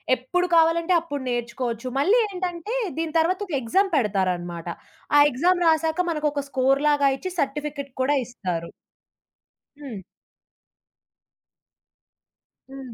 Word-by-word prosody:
ఎప్పుడు 355 +9 -1
కావాలంటే 330 +2 +4
అప్పుడు 290 -5 -5
నేర్చుకోవచ్చు. 240 0 -3
మళ్ళీ 395 - +4
ఏంటంటే, 360 +2 -4 0.2
దీని 325 -1 -2
తర్వాత 360 +4 +1
ఒక 345 - -7
ఎగ్జామ్ 385 - +2
పెడతారనమాట. 180 - -1 0.5
ఆ - - +8
ఎగ్జామ్ 350 +7 +1
రాసాక 320 +2 +2
మనకొక 300 -3 -1
స్కోర్‌లాగా 275 +2 +3
ఇచ్చి, 370 +4 -5
సర్టిఫికెట్ 285 0 -3
కూడా 285 +3 +2
ఇస్తారు. 180 -8 -5 1.1
హ్మ్. 255 -9 -7 2.7
హ్మ్. 265 -3 -9
285 Hz, 100 wpm, -24 LUFS, 245-330 Hz, 2.7 s, ఆ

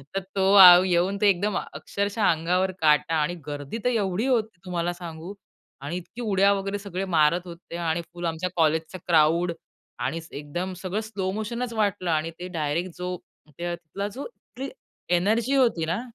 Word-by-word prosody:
तर - - +2 0.2
तो 190 0 +3
आव 180 0 +10
येऊन 185 +2 +1
ते 205 - +6
एकदम, 200 +2 +1 0.2
अक्षरशः 200 +2 -2
अंगावर 180 +4 +1
काटा 160 +2 +3
आणि 155 +3 0
गर्दी 145 +6 -5
तर 250 - +3
एवढी 210 -2 0
होती 220 -7 0
तुम्हाला 175 -1 -2
सांगू. 170 +1 -8 0.5
आणि 145 +5 -4
इतकी 180 +7 -9
उड्या 200 -2 +3
वगैरे 195 +1 -2
सगळे 195 -1 -4
मारत 155 +3 +4
होते 170 0 -9
आणि 170 0 -1
फुल 175 0 -5
आमच्या 165 +2 -2
कॉलेजचा 160 +2 +1
क्राउड 170 +1 +4 0.5
आणि 160 +5 -2
एकदम 175 +6 -5
सगळं 195 +3 -2
स्लो 200 -4 -3
मोशनच 235 +3 -3
वाटलं 205 -4 0
आणि 160 +1 0
ते 180 - -5
डायरेक्ट 160 +4 -1
जो 180 0 -3 0.4
त्या 175 0 -3
तिथला 175 +4 -6
जो 255 +7 -7
तिथली 270 - -9 0.5
एनर्जी 225 +8 +1
होती 230 -11 +3
ना, 180 +8 -1
180 Hz, 165 wpm, -25 LUFS, 165-200 Hz, 0.5 s, आव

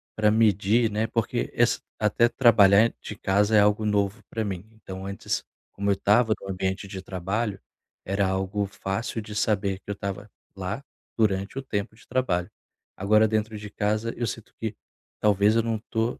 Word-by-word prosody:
pra 110 -1 +3
medir, 110 +1 +3
né, 110 +2 0
porque 115 -1 -1
es - - +2 0.2
até 110 +2 +3
trabalhar 110 -3 +5
de 105 - -7
casa 100 +2 +2
é - - +7
algo 105 +1 +3
novo 105 +1 0
pra 110 - -2
mim. 95 -1 -4
Então 95 -4 -9
antes, 100 0 -3 0.3
como 100 0 -2
eu - - +3
tava 110 +3 +3
no 95 - -9
ambiente 95 +1 -2
de 95 -1 -7
trabalho, 95 +3 -3 0.5
era 100 +1 +1
algo 95 +2 -1
fácil 100 +4 -3
de 105 0 -9
saber 100 -2 0
que - - -18
eu - - -3
tava 100 +1 -5 0.3
lá 95 +7 -4 0.3
durante 100 0 +1
o - - -1
tempo 105 -5 -3
de 115 - -20
trabalho. 90 -9 0 0.5
Agora 105 +3 +4
dentro 110 0 -1
de 105 0 -8
casa 110 +3 -1
eu 120 0 -2
sinto 115 - -7
que 110 -2 -3 0.4
talvez 105 +1 +4
eu 115 - +3
não 115 -1 -1
tô 115 +2 -1
105 Hz, 180 wpm, -26 LUFS, 100-110 Hz, 0.5 s, é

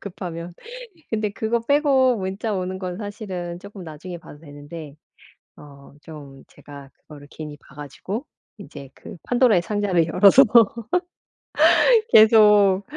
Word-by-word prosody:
급하면. 175 -3 -8 0.6
근데 215 -2 -2
그거 220 +3 -2
빼고 265 0 +2
문자 195 +3 -4
오는 185 -1 -4
건 180 -2 -6
사실은 190 -5 -7
쪼끔 200 0 -12
나중에 170 +2 -9
봐도 150 -3 -15
되는데 145 0 -11 0.6
어 140 -1 -16
좀 145 -4 -13
제가 140 -1 -14
그거를 145 -2 -16
괜히 150 -1 -10
봐 140 - -21
가지고 165 - -7 0.3
인제 145 -8 -12
그 - - -13
판도라의 240 -7 +2
상자를 190 -4 -1
열어서 200 +9 +6 1.7
계속 210 -3 +5
185 Hz, 255 characters per minute, -21 LUFS, 150-210 Hz, 1.7 s, 열어서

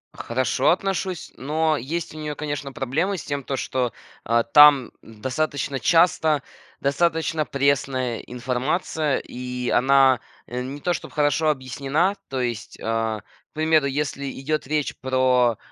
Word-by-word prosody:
Хорошо 130 +2 0
отношусь, 185 -1 -1
но 155 +3 +1
есть 155 +6 -4
у 155 - -9
нее, 150 -1 -4
конечно, 145 -2 -4
проблемы 155 +10 -1
с - - -7
тем, 140 -2 -3
то, 135 - -3
что, 125 -2 -1 0.3
э, 115 +1 +3
там 145 -4 +8
достаточно 135 +5 -3
часто 160 -2 +3 0.4
достаточно 160 +2 +1
пресная 130 -3 0
информация 130 +5 -1
и 125 0 -5
она, 135 -1 +5 0.3
э, 125 +1 -4
не 135 +3 -6
то 175 - +1
чтобы - - -7
хорошо 150 +1 +2
объяснена. 140 +7 0
То 130 -1 -2
есть, 120 -4 -4
а, 115 -1 -1
к - - -32
примеру, 155 -1 +3
если 140 0 -2
идет 155 +1 -2
речь 150 0 -1
про, 130 -3 +2
140 Hz, 135 wpm, -23 LUFS, 125-155 Hz, 0.4 s, там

